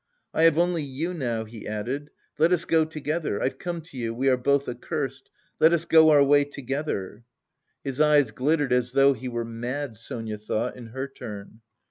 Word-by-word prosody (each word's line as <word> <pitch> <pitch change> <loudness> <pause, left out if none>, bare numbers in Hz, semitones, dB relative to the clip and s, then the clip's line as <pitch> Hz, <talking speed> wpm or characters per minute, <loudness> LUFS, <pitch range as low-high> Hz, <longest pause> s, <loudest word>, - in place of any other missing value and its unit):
"I 160 - +4
have 165 -2 +5
only 175 -1 +2
you 145 +5 -3
now," 120 -8 -2
he 110 0 -10
added. 125 +8 -4 0.3
"Let 165 +3 +4
us 170 -2 +2
go 160 -1 +3
together.... 155 -5 -3
I've 130 - -2
come 175 -1 -4
to 160 -4 -14
you, 115 -2 -3
we 135 +3 +2
are 130 - +5
both 140 +2 +1
accursed, 135 +2 -4 0.3
let 160 +2 +6
us 170 -1 +1
go 160 -1 +6
our 145 -2 +6
way 145 +1 +5
together!" 135 -6 -4 0.6
His 135 +1 -2
eyes 150 -6 +4
glittered 145 +3 +1
"as 125 0 +1
though 140 0 +5
he 130 -1 -7
were 120 -1 -3
mad," 120 +2 -4
Sonia 115 -1 -6
thought, 110 +3 -2
in 120 -2 -10
her 130 +4 -5
turn. 105 -4 -9
135 Hz, 190 wpm, -26 LUFS, 120-155 Hz, 0.6 s, let